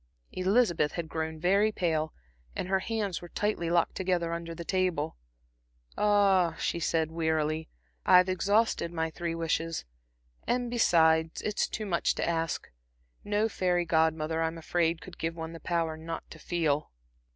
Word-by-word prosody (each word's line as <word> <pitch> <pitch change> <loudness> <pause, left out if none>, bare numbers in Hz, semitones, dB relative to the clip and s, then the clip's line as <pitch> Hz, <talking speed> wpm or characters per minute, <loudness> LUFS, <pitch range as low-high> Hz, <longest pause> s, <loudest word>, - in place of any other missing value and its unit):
Elizabeth 185 -5 +2
had 170 -2 -3
grown 160 0 -4
very 200 +5 +3
pale, 160 -5 0 0.4
and - - -3
her 190 0 +2
hands 210 -3 -2
were 175 - -10
tightly 205 -5 -1
locked 170 -1 +2
together 180 -3 0
under 170 0 -5
the 170 - -7
table. 180 -5 0 0.8
"Ah," 195 -5 +3
she 170 - -2
said, 160 -1 0
wearily 160 -1 0 0.3
"I've 180 0 +6
exhausted 195 0 +1
my 160 -1 -2
three 170 +1 -3
wishes. 165 0 -1 0.6
And, 245 0 0
besides, 160 -8 +3
it's 210 0 0
too 215 - -4
much 175 -4 +1
to - - -1
ask. 165 -1 -2 0.5
No 210 +1 +1
fairy 180 -4 0
Godmother, 160 -1 +1
I'm 165 0 -1
afraid, 165 0 0
could 185 - -12
give 165 0 -2
one 160 0 -6
the 165 - -8
power 165 -2 -1
not 165 +1 -6
to 160 - -10
feel." 155 -4 0
170 Hz, 150 wpm, -29 LUFS, 160-185 Hz, 0.8 s, I've